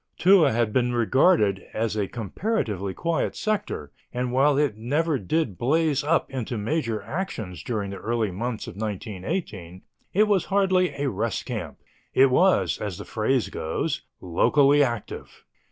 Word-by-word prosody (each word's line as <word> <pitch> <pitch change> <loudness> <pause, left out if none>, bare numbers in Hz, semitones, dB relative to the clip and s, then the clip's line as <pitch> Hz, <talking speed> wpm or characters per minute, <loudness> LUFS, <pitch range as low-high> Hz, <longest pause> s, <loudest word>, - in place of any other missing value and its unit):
Toul 185 -4 +6
had 115 -3 0
been 125 -1 +1
regarded 120 - +3
as 110 -1 -1
a 105 -2 0
comparatively 110 - -2
quiet 170 -1 -1
sector, 210 - -2 0.2
and, 125 0 -2
while 135 +2 +3
it 145 -7 +1
never 145 +6 0
did 105 - -1
blaze 150 +2 +2
up 160 +3 +1
into 125 -3 -3
major 115 -1 -2
actions 110 - -5
during 105 -5 -3
the 100 - -6
early 115 -3 -1
months 115 +4 -4
of - - -9
1918, 100 - -5 0.3
it 215 +3 +3
was 200 -4 +2
hardly 190 -2 +2
a 140 0 -1
rest 110 -3 -2
camp. - - -5 0.4
It 135 0 +6
was, 185 +8 +3
as 100 -5 -4
the - - -8
phrase 115 +3 0
goes, 135 - -2 0.2
"locally 140 - +3
active." 120 -6 -3
125 Hz, 150 wpm, -25 LUFS, 105-160 Hz, 0.4 s, Toul